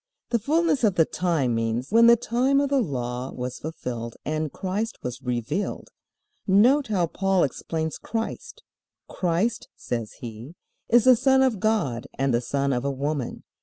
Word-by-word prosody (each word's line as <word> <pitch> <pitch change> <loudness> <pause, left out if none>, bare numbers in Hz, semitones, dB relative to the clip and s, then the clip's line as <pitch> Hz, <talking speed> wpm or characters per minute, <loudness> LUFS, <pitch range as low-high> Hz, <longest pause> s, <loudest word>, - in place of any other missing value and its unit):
"The 235 - +2
fullness 305 +3 +1
of 205 -5 +3
the 165 - +4
time" 160 -9 0
means 115 - -2
when 230 +1 +6
the 235 - +8
time 255 +4 +1
of 280 -1 +1
the 275 -2 +3
Law 125 - -3
was 125 0 -5
fulfilled 120 -7 -5
and 155 -1 -2
Christ 205 +4 -3
was 125 +1 -5
revealed. 125 - -3 0.6
Note 245 +9 +4
how 195 -5 +1
Paul 190 +2 +1
explains 160 +3 -3
Christ. 225 0 -5 0.4
"Christ," 185 +6 -1
says 115 -3 -4
he, 120 +6 -9 0.3
"is 235 0 +5
the 255 0 +7
Son 265 +2 +4
of 245 -6 +1
God 205 - 0
and 135 -1 +1
the 120 - +2
son 140 +2 -1
of 125 0 -1
a 140 - 0
woman. 140 -1 -3
165 Hz, 165 wpm, -25 LUFS, -, 0.6 s, the